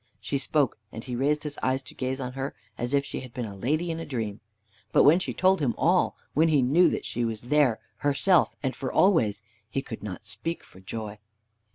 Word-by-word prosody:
She 140 - -2
spoke, 140 -3 +1
and 115 - -7
he 125 -1 -4
raised 145 +4 +1
his 150 -1 -4
eyes 130 +1 0
to - - -12
gaze 130 +1 -3
on 125 -1 -4
her, 135 +1 -4 0.2
as 120 +4 -1
if 140 0 +2
she - - -4
had 125 -2 -10
been 125 - -2
a 100 -2 -7
lady 155 - 0
in 165 - -4
a - - -4
dream. 110 -7 -3 0.5
But - - +5
when 155 +5 +7
she - - -3
told 190 +1 +3
him 135 -6 0
all, 180 +2 +2 0.2
when 160 +2 +4
he 150 -5 +4
knew 155 +9 +5
that - - -3
she 120 - -2
was 115 -2 -2
there 140 -7 +4 0.2
herself, 145 +5 +3
and 130 -1 -1
for 130 -2 -4
always, 110 - +3 0.3
he 135 +4 -2
could 110 - -7
not 105 -1 -7
speak 165 +10 -4
for 95 - -17
joy. 105 +2 -6
135 Hz, 225 wpm, -27 LUFS, 115-150 Hz, 0.5 s, when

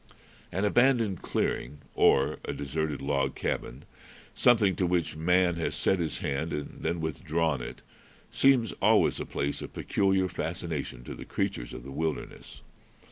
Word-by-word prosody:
An 95 +4 0
abandoned 115 -4 +3
clearing 75 - -2 0.2
or 70 +3 +3
a - - -3
deserted 75 0 -3
log 70 -1 0
cabin, 65 +4 -3 0.5
something 110 -6 +4
to 90 - +1
which 85 -3 0
man 90 +2 +2
has 80 - -2
set 95 - +2
his 80 -2 -1
hand 75 +3 -2
and 75 -1 -5
then 85 -1 -1
withdrawn 80 -2 -1
it, - - -8 0.5
seems 130 -6 +4
always - - +4
a - - -4
place 70 +1 -2
of - - -8
peculiar 95 -1 +1
fascination 80 -8 -4
to - - -7
the - - -8
creatures - - -3
of 65 - -8
the 70 - -9
wilderness. 80 +3 -4
80 Hz, 150 wpm, -29 LUFS, 70-95 Hz, 0.5 s, something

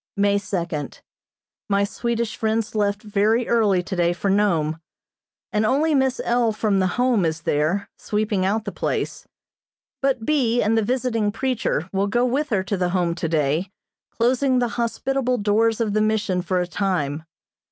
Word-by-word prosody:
May 200 0 +3
second: 175 -7 -4 0.7
My 200 0 +2
Swedish 235 +2 -2
friends 220 0 -1
left 205 -1 0
very 215 +3 +1
early 205 -6 +2
today 175 -2 0
for 195 +2 -1
Nome, 165 -6 +1 0.7
and 210 0 +2
only 285 +8 +2
Miss 265 -2 +1
L. 235 -1 +2
from 210 -2 +1
the 185 +2 0
Home 245 -5 +2
is 160 0 -1
there, 170 +5 0
sweeping 210 -2 -1
out 215 +3 0
the 200 - -3
place; - - -3 0.7
but 265 -4 0
B. 245 -5 +2
and 220 +1 +2
the 225 - +3
visiting 230 -2 0
preacher 225 - -1
will 195 +1 +1
go 240 +4 +1
with 280 +5 0
her 200 -5 +1
to 200 +1 -2
the 180 -1 0
Home 175 -2 0
today, 160 +1 0 0.4
closing 255 +2 +1
the 245 -1 +1
hospitable 250 +2 -1
doors 220 +2 +2
of 220 -3 0
the 215 - +2
Mission 215 -4 +1
for 180 +1 -1
a 180 - 0
time. 165 -5 -2
210 Hz, 165 wpm, -22 LUFS, 185-235 Hz, 0.7 s, May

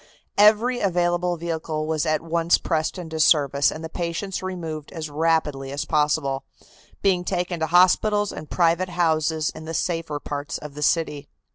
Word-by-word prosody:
Every 220 +4 +5
available 175 -1 +1
vehicle 160 -2 -3
was 160 0 -1
at 155 0 +1
once 165 +1 +2
pressed 160 +1 -1
into 160 -3 -6
service 145 -3 +4
and 160 - -7
the - - -3
patients 170 +3 -4
removed 165 -5 -5
as 155 -3 -6
rapidly 150 -3 0
as 140 +1 -3
possible, 150 -3 0 0.6
being 185 -3 +2
taken 180 -1 -2
to 160 - 0
hospitals 200 +4 +3
and 155 - -8
private 170 +1 +2
houses 160 -2 +1
in 155 - -10
the 165 +1 -5
safer 165 -4 -2
parts 145 0 -4
of 150 -1 -9
the 150 - -8
city. 150 -2 0
165 Hz, 160 wpm, -23 LUFS, 155-175 Hz, 0.6 s, Every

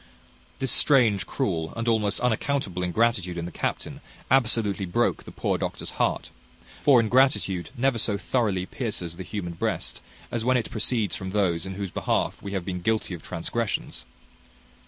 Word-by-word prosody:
This 135 -2 0
strange, 115 - +4
cruel, 80 -1 -1
and 115 0 -2
almost 110 -3 +1
unaccountable 125 -5 0
ingratitude 90 -1 +1
in 85 - -3
the 90 - -6
captain, - - -3 0.3
absolutely 110 -6 +2
broke 85 - +1
the - - -9
poor - - -1
doctor's - - -3
heart; - - 0 0.5
for 140 -4 +6
ingratitude 115 -6 +3
never 130 -1 +2
so 105 -1 +1
thoroughly 100 -2 0
pierces 95 -8 -3
the - - -6
human 90 -2 -4
breast 85 - -2 0.3
as 115 -2 -1
when 130 +1 +3
it 115 - -3
proceeds 110 -2 0
from 95 - -5
those 95 -3 +1
in 95 - -5
whose 100 -2 -4
behalf - - 0
we 100 - -6
have 95 -3 -2
been 90 -2 -3
guilty 110 -1 0
of 85 - -6
transgressions. 100 +7 -3
105 Hz, 160 wpm, -26 LUFS, 90-120 Hz, 0.5 s, for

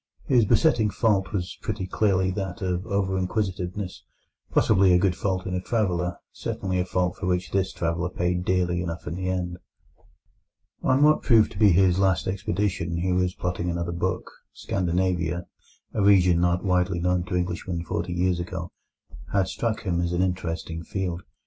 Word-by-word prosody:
His 120 -4 +4
besetting 115 -3 +3
fault 100 -4 +1
was 95 -1 -4
pretty 95 - -3
clearly 95 -1 +1
that 95 +1 -4
of 90 +2 -2
over 95 -2 0
inquisitiveness, 95 -1 -3 0.5
possibly 95 -3 +4
a - - +6
good 90 -1 +2
fault 95 -1 -2
in 95 - -3
a 90 - -1
traveller, 90 -5 -1
certainly 95 -1 -3
a 90 - +1
fault 90 -1 -1
for 95 - -3
which 90 0 -1
this 95 -1 0
traveller 85 +1 -1
paid 90 0 -1
dearly 90 -1 +1
enough 85 -1 -5
in 75 - -4
the 90 +1 -3
end. 90 -1 -2 1.2
On 130 +2 +3
what 155 +1 +5
proved 115 -3 +4
to - - -8
be 105 -2 +7
his 95 0 +4
last 95 -7 +2
expedition, 95 -3 -1
he 90 +2 0
was 90 0 +1
plotting 90 0 -2
another 85 0 -2
book. 85 - -2 0.2
Scandinavia, 90 -2 -1 0.5
a 110 - 0
region 90 -4 +5
not 90 +2 +1
widely 90 -1 +1
known 90 0 +1
to 90 - -3
Englishmen 90 -1 -2
forty 85 +1 -3
years 90 0 +1
ago, 85 0 -5 0.6
had 95 -1 +2
struck 115 -1 -2
him 85 -4 0
as 85 0 -1
an 90 +1 +2
interesting 85 -2 -3
field. 90 -2 -3
90 Hz, 170 wpm, -25 LUFS, 90-95 Hz, 1.2 s, be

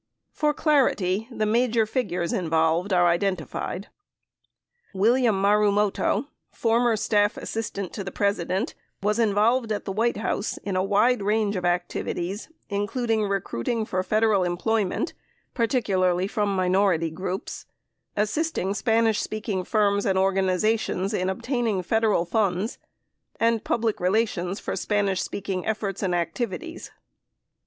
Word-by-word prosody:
For 300 -1 +1
clarity, 225 - +1
the 215 -3 -2
major 230 +1 +2
figures 190 -8 -2
involved 165 +2 +1
are 175 -1 +4
identified: 180 +1 -2 1.1
William 225 +1 +3
Marumoto, 205 +2 +2 0.2
former 230 0 +2
Staff 210 -1 +1
Assistant 205 -4 -4
to 200 - -4
the 190 - -5
President, 200 - -1 0.3
was 210 +2 +1
involved 225 +2 +2
at 210 - -2
the 195 - -3
White 230 +4 +1
House 215 -1 -2
in 200 -2 -3
a 185 - +2
wide 210 +5 +3
range 210 0 +1
of 180 -1 -2
activities, 175 - -2 0.2
including 215 +2 0
recruiting 200 - -2
for 185 -3 -1
Federal 215 0 +2
employment 195 - -1 0.4
(particularly 190 -7 +1
from 205 -2 -1
minority 185 -3 +2
groups), 185 +3 -5 0.5
assisting 215 - 0
Spanish 225 0 +2
speaking 215 -3 -3
firms 205 0 +1
and 190 -1 +2
organizations 195 +1 +1
in 185 -2 0
obtain 240 +5 -1
ing 195 -4 0
Federal 215 -2 +2
funds, 195 +3 0 0.6
and 230 -1 +2
public 225 -2 0
relations 190 -1 0
for - - -4
Spanish 200 -3 0
speaking 190 -2 -3
efforts 205 -3 -2
and 185 -3 0
activities. 180 - -3
205 Hz, 125 wpm, -25 LUFS, 185-225 Hz, 1.1 s, are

